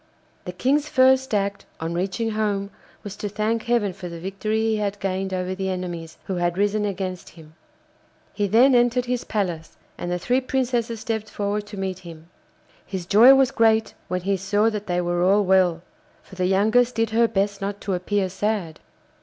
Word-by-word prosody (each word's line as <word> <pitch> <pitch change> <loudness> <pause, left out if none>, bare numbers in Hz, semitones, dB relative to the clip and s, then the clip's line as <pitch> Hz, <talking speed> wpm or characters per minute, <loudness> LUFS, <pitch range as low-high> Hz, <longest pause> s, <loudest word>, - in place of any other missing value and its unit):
The 180 - -4
King's 280 +10 0
first 265 0 +4
act 200 -1 -1
on 165 +1 -3
reaching 195 +6 -2
home 205 -2 -1 0.3
was 205 -1 -7
to 205 - -4
thank 215 +2 -1
Heaven 235 -5 +1
for 180 -1 -8
the 170 0 -8
victory 195 +4 -2
he 220 -1 +1
had 205 -1 -2
gained 190 0 -2
over 185 0 -2
the 190 0 -3
enemies 175 -3 -5
who 190 - -3
had 175 0 0
risen 205 +1 +1
against 185 -2 -4
him. 155 -2 -16 0.8
He 205 -1 0
then 240 +7 +5
entered 245 0 +3
his 250 -1 -2
palace, 175 -7 -3 0.2
and 175 - -4
the 180 - 0
three 250 +9 +1
Princesses 240 -4 -1
stepped 220 -1 -3
forward 205 0 -3
to 205 - -9
meet 190 -1 -3
him. 165 -2 -12 0.5
His 185 -2 -6
joy 230 +9 +7
was 270 -1 +3
great 220 -2 +2
when 180 0 -2
he 195 +2 0
saw 205 +4 +1
that 210 -1 -5
they 180 -1 0
were 175 0 -1
all 195 +3 +4
well, 180 -3 +2 0.4
for - - -18
the 185 -1 -1
youngest 220 +6 +3
did 225 -1 0
her 230 +1 +4
best 200 -1 -1
not 200 +1 -3
to 200 - -2
appear 190 +2 0
sad. 190 -3 -2
200 Hz, 190 wpm, -23 LUFS, 185-220 Hz, 0.8 s, joy